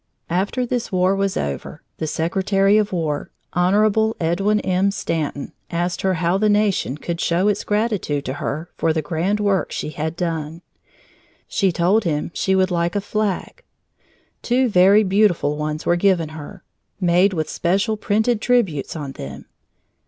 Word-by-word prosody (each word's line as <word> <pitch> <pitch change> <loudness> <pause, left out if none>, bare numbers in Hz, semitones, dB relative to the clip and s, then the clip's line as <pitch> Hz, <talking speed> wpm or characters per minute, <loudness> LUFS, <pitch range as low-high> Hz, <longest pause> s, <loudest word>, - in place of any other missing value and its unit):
After 200 +8 0
this 245 -1 -3
war 185 +1 +2
was 195 -1 -1
over, 70 -2 -4 0.2
the 160 - -2
Secretary 195 +5 +1
of 210 -1 -1
War, 160 -5 -2 0.2
Honorable 210 +5 +2
Edwin 195 +6 +1
M. 190 +1 +1
Stanton, 160 -7 -3 0.2
asked 175 +1 -2
her 190 -1 +1
how 175 +3 +1
the 215 0 +3
nation 205 -9 +1
could 170 +2 -4
show 175 +4 +1
its 205 -1 +1
gratitude 210 -10 -1
to 130 - -3
her 155 +4 -3
for 160 - +1
the 160 -1 -1
grand 175 +7 -1
work 200 -2 +1
she - - -3
had 155 +1 -3
done. 165 -1 -3 0.8
She 195 -2 +1
told 180 +6 +2
him 155 -3 -2
she 190 - +1
would 190 0 +2
like 170 +1 0
a - - +2
flag. 210 - -2 0.8
Two 250 +1 +2
very 200 +2 +5
beautiful 190 -6 +2
ones 150 +1 -3
were 175 - +3
given 175 -3 +2
her, 160 +5 -10 0.4
made 180 +2 +3
with 155 -3 -2
special 195 +8 0
printed 215 +2 0
tributes 195 - +1
on 145 -4 -5
them. 70 - -8
185 Hz, 160 wpm, -21 LUFS, 165-205 Hz, 0.8 s, very